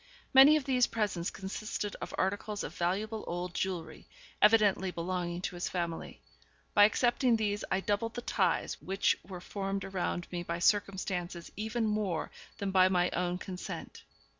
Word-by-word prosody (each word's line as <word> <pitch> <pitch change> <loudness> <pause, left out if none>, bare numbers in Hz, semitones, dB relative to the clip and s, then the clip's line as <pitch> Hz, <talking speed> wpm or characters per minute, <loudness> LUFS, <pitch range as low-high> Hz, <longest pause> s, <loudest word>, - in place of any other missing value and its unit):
Many 270 +3 +9
of 300 - -2
these 255 -3 +3
presents 200 -6 -1
consisted 205 +1 -4
of - - -5
articles 205 +2 -1
of - - -6
valuable 210 +5 -1
old 175 +1 -3
jewellery, 180 -4 -4 0.3
evidently 210 -3 +5
belonging 175 0 -3
to - - -2
his 175 0 -3
family; 170 -2 -4 0.5
by 205 -1 +8
accepting 240 +3 +3
these 210 -2 -1
I 190 - +1
doubled 210 +3 -1
the 245 - -4
ties 185 -7 0
which 195 +2 +1
were 185 -2 -8
formed 195 +1 -3
around 180 -2 -2
me 175 -1 -3
by 170 -1 -3
circumstances 180 -3 0
even 220 +2 -1
more 210 -6 -1 0.3
than 200 -3 -2
by 185 -1 +5
my 180 -1 +2
own 180 0 -1
consent. 185 0 -7
195 Hz, 155 wpm, -31 LUFS, 180-215 Hz, 0.5 s, Many